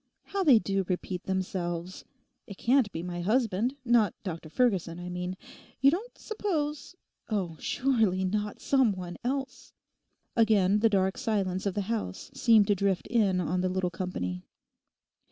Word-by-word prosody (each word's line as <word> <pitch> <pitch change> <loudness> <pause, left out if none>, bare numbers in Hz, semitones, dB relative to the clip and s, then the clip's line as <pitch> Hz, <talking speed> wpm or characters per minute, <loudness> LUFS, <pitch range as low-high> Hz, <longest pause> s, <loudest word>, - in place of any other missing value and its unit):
How 395 -1 -2
they 280 -9 +7
do 195 -2 0
repeat 180 -1 -3
themselves. 185 -2 -3 0.4
It 200 -4 -9
can't 245 -3 +3
be 165 - -5
my 175 -1 -4
husband; 225 +3 +1
not 230 -5 +3
Dr 165 -5 -6
Ferguson, 180 -5 +1
I 180 0 -6
mean. 180 +1 -4 0.4
You 275 +2 +6
don't 420 +9 -4
suppose—oh 300 - -4
surely, 225 -9 +1
not 210 +2 -2
"some 265 -6 +3
one" 180 -2 -7
else!' 265 +1 -4 0.6
Again 210 -3 +4
the 225 +1 +4
dark 190 +2 +1
silence 200 -6 -1
of 195 - -2
the 205 - 0
house 200 - -4
seemed 225 -3 +5
to 205 - +3
drift 195 -1 0
in 205 -6 +2
on 180 +1 0
the 185 - 0
little 185 -1 -1
company. 90 - -4
200 Hz, 150 wpm, -29 LUFS, 180-240 Hz, 0.6 s, they